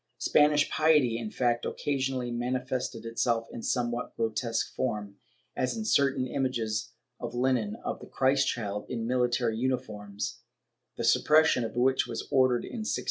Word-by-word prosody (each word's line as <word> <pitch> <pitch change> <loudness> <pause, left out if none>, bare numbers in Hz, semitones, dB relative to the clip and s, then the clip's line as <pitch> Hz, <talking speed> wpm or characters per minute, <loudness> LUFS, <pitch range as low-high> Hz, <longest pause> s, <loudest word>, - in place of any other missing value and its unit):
* - - -51
Spanish 150 0 +4
piety, 150 -7 +3
in 115 -2 -4
fact, 120 0 0
occasionally 130 -3 -2
manifested 125 -1 -2
itself 115 0 0
in 115 - -7
somewhat 120 0 -2
grotesque 115 +1 -1
form, 105 -5 -3 0.4
as 130 - -1
in 220 - -3
certain 140 -9 +2
images 120 -5 -2 0.3
on - - -4
linen 125 -5 +1
of - - -3
the - - -11
Christ 135 +1 +2
child, 105 -3 -3
in 115 -2 -3
military 120 -2 +1
uniforms, 105 -6 -3 0.6
the - - -3
suppression 155 -5 +4
of 115 - -5
which 130 +2 +2
was 115 - -5
ordered 130 -2 +3
in 240 - -6
1619. 215 - -1
125 Hz, 150 wpm, -29 LUFS, 115-130 Hz, 0.6 s, Spanish